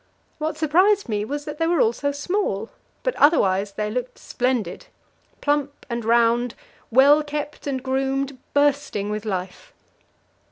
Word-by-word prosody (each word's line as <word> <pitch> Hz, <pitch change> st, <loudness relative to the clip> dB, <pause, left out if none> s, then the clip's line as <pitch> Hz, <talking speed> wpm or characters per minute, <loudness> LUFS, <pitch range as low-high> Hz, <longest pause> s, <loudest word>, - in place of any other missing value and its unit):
What 310 Hz, 0 st, -2 dB
surprised 365 Hz, +6 st, +3 dB
me 210 Hz, -2 st, -1 dB
was 290 Hz, +6 st, -4 dB
that 300 Hz, +1 st, -7 dB
they 330 Hz, -, +2 dB
were 340 Hz, -2 st, +2 dB
all 225 Hz, -1 st, +4 dB
so 285 Hz, +3 st, -1 dB
small; 285 Hz, -, -2 dB, 0.3 s
but -, -, 0 dB
otherwise 200 Hz, -, +3 dB
they 210 Hz, +1 st, -3 dB
looked 250 Hz, +2 st, -4 dB
splendid. 245 Hz, -8 st, -2 dB, 0.5 s
Plump 290 Hz, -1 st, -1 dB
and 235 Hz, 0 st, -2 dB
round, 235 Hz, +1 st, +2 dB, 0.3 s
well 280 Hz, +5 st, +6 dB
kept 295 Hz, 0 st, -5 dB
and 265 Hz, -2 st, -2 dB
groomed, 270 Hz, 0 st, -1 dB, 0.2 s
bursting 285 Hz, -8 st, +1 dB
with 210 Hz, +1 st, -4 dB
life. 190 Hz, -, -5 dB
270 Hz, 145 wpm, -23 LUFS, 225-295 Hz, 0.5 s, well